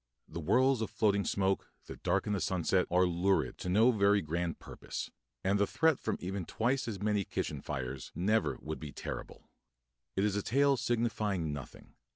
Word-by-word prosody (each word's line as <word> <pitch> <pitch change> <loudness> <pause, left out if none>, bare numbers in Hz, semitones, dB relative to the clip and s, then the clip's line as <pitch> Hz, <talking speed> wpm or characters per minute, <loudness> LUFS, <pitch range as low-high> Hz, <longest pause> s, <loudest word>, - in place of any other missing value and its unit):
The 85 - -6
whirls 130 - +3
of 110 - -1
floating 100 -2 +2
smoke 95 -1 0 0.2
that - - -10
darken 105 - +1
the 100 - 0
sunset 90 0 +1
are 90 +1 +4
'lurid' 90 +3 +1
to 90 - -4
no 110 +7 +5
very 100 -2 +4
grand 85 0 -2
purpose; - - -7 0.3
and 100 +2 +2
the 100 - +3
threat 160 -3 +2
from 110 - -2
even 95 +1 -3
twice 120 +8 0
as 105 -4 -4
many 105 -1 +1
kitchen 75 -5 -3
fires 65 -3 -5
never 105 +5 +1
would 80 +1 -4
be 75 -2 -7
terrible. - - -7 0.7
It 95 - +1
is 105 -1 +1
a 105 - +1
tale 140 +6 +3
signifying 105 - 0
nothing. 70 -3 -9
100 Hz, 180 wpm, -32 LUFS, 85-110 Hz, 0.7 s, no